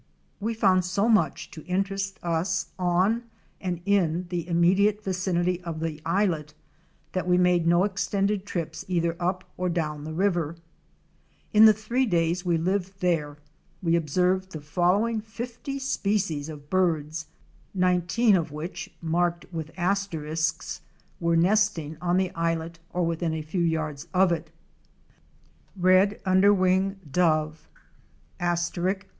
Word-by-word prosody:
We 225 +3 -2
found 185 -4 +3
so 185 +4 0
much 220 -3 +1
to 155 - -10
interest 195 +1 -1
us 170 +1 -1
on 185 +7 +2 0.4
and 180 -3 -3
in 185 -4 +2
the 175 -2 -3
immediate 190 +5 +3
vicinity 180 -2 0
of 165 -2 -5
the 160 -2 -4
islet 165 -4 0 0.6
that 185 -2 -2
we 180 0 +4
made 180 -2 +3
no 175 +2 +4
extended 200 0 0
trips 165 -5 -4
either 170 -2 0
up 180 +1 -1
or 180 0 -1
down 155 -4 -2
the 155 - -6
river. 175 -4 0 1.0
In 215 +1 +8
the 220 - +10
three 235 +5 -1
days 170 -1 +1
we 175 -2 +1
lived 190 +3 -2
there 155 -5 0 0.5
we 170 -1 +3
observed 180 +4 +1
the 155 - -5
following 185 +9 +1
fifty 240 +5 -6
species 200 - -1
of 145 -2 -10
birds, 160 -4 0 0.5
nineteen 180 +4 +3
of 165 -3 0
which 155 +2 -6
(marked 170 +1 0
with 160 -2 -4
asterisks) 165 -4 -1 0.4
were 170 -1 +2
nesting 175 -4 +2
on 180 0 +1
the 185 -1 +1
islet 165 0 -2
or 180 -1 -1
within 165 -1 -1
a 155 - -4
few 175 +4 -2
yards 155 -4 -1
of 185 -1 +5
it: 165 -1 -2 1.3
Red 185 +3 +4
underwing 190 0 +3
Dove 155 -1 +1 0.7
(Leptoptila 175 +2 0
rufaxilla). 195 - -20
180 Hz, 135 wpm, -26 LUFS, 165-195 Hz, 1.3 s, the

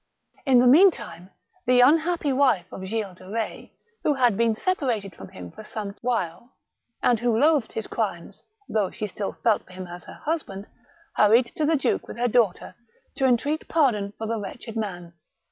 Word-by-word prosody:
In 260 -2 +6
the 245 - +5
meantime, 270 - +4 0.4
the 250 0 +5
unhappy 315 +2 +3
wife 255 -10 +3
of 190 - -8
Gilles 210 -2 -3
de 185 0 -13
Betz, 225 +1 -4 0.3
who 295 - +2
had 245 -5 +3
been 230 +1 +2
separated 235 - -1
from 95 - -10
him 90 -2 -10
for - - -11
some 210 -2 -6
while, 235 -2 -3 0.5
and 240 -3 +3
who 235 -1 +1
loathed 290 -2 +3
his 220 - -3
crimes, 195 -7 -4 0.3
though 210 -4 0
she 215 - -5
still 200 0 -4
felt 225 -3 +3
for 185 - -15
him 185 0 -7
as 175 0 -10
her - - -12
husband, 285 -11 -3 0.5
hurried 225 +4 +5
to 305 - 0
the 325 - +3
duke 280 - 0
with - - -8
her 245 +1 +1
daughter 225 -7 +1 0.4
to 265 - +3
entreat 285 +6 0
pardon 235 -11 +1
for 220 - -4
the 225 0 -2
wretched 225 +2 -8
man. 180 -6 -5
225 Hz, 180 wpm, -25 LUFS, 200-260 Hz, 0.5 s, In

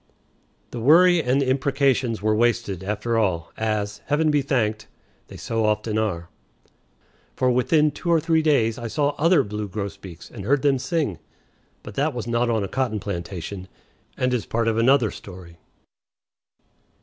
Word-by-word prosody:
The 120 - -5
worry 170 +7 +5
and 130 0 +1
the 135 - 0
imprecations 130 -3 +1
were 110 0 +2
wasted, 115 -5 0
after 105 +3 -1
all, 90 -7 -1
as, 105 -2 -2
Heaven 150 +2 +2
be 145 -1 +2
thanked, 110 -6 -1 0.4
they - - -11
so 115 -1 -2
often 105 0 0
are; 90 -6 -2 1.1
for 130 -1 +2
within 150 +5 +3
two 170 - -6
or 165 -1 +4
three 160 0 +2
days 125 -7 +2
I 120 - -4
saw 145 +5 0
other 165 -1 +4
blue 105 -1 -5
grosbeaks 95 -3 -7
and 105 - -8
heard 135 +6 +1
them 140 -2 +3
sing. 135 - -2 0.6
But 105 - -9
that 145 +4 -1
was 120 - -4
not 120 +1 0
on 110 -3 0
a - - -2
cotton 120 -2 -2
plantation, 95 0 -6 0.5
and 125 0 0
is 125 - -2
part 115 0 -1
of 115 0 +1
another 120 -2 +3
story. 90 -3 -12
115 Hz, 160 wpm, -23 LUFS, 105-140 Hz, 1.1 s, worry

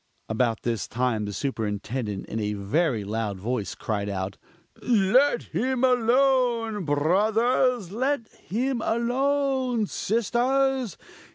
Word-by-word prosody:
About 115 0 0
this 115 -3 -1
time 115 -3 -1
the 105 - -4
Superintendent 105 -2 -3
in 110 - -4
a 105 -1 -1
very 115 - 0
loud 105 -1 -3
voice 110 +2 -3
cried 105 -2 -3
out 95 0 -3 0.5
"Let 240 +4 +3
him 260 +1 -1
alone, 245 -4 +2
brothers! 215 - +2
let 255 +2 -1
him 245 +4 -3
alone 255 0 +1
sisters! 245 - 0
210 Hz, 105 wpm, -25 LUFS, -, 0.5 s, Let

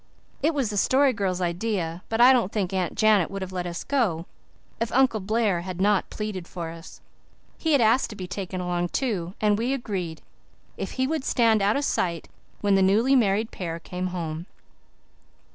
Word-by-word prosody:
It 310 +2 +1
was 260 -7 0
the 205 - -3
Story 265 +5 +4
Girl's 190 -4 -1
idea, 175 -1 -2
but 225 - -1
I 250 +2 +8
don't 230 -6 +1
think 195 -3 -2
Aunt 185 -3 -1
Janet 215 -5 +4
would 195 -1 -4
have 190 - -7
let 180 -1 -3
us 175 0 -5
go 210 - 0 0.5
if 230 0 -1
Uncle 260 -4 +3
Blair 210 -2 0
had 185 0 -6
not 200 0 +2
pleaded 210 -5 -5
for 170 -2 -6
us. 165 0 -12 0.6
He 320 -3 +2
asked 235 0 +3
to 215 - -8
be 185 - -6
taken 185 0 -5
along, 175 -1 -1
too, 195 -8 -2
and 210 -1 +2
we 245 +4 0
agreed, 185 -10 -4 0.5
if - - -5
he 260 - 0
would 310 0 -1
stand 230 -5 +3
out 205 +5 +2
of 285 - 0
sight 170 - -1 0.3
when 205 -1 +2
the 195 - +4
newly 220 +8 +4
married 220 -2 +2
pair 165 -3 -4
came 180 +2 -4
home. 170 -1 -5
200 Hz, 190 wpm, -25 LUFS, 180-230 Hz, 0.6 s, I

